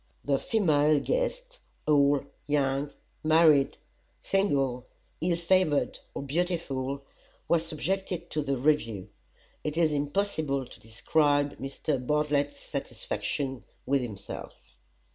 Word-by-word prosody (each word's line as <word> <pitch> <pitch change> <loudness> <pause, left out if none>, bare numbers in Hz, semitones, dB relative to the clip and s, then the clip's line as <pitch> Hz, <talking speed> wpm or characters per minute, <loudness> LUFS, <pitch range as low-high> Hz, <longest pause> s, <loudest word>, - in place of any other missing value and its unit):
The 140 -1 +2
female 155 -8 +3
guests - - -2 0.3
old, 145 -1 +4 0.2
young, 140 0 +1 0.3
married, 155 -3 +5 0.5
single, 135 -10 +1 0.3
ill 170 0 +1
favored 170 -3 +2 0.2
or - - -3
beautiful 140 -4 -2 0.4
were 170 - +4
subjected 170 +2 -3
to 150 - 0
the 140 -2 -1
review. 115 -8 +1 0.5
It 150 +1 -3
is 165 -2 +4
impossible 145 -2 0
to - - -14
describe 145 +5 +1
Mr. 135 0 -2
Bartlett's 145 0 +1
satisfaction 135 -3 -4 0.2
with 140 0 +2
himself. 105 -5 -7
145 Hz, 105 wpm, -28 LUFS, 135-165 Hz, 0.5 s, married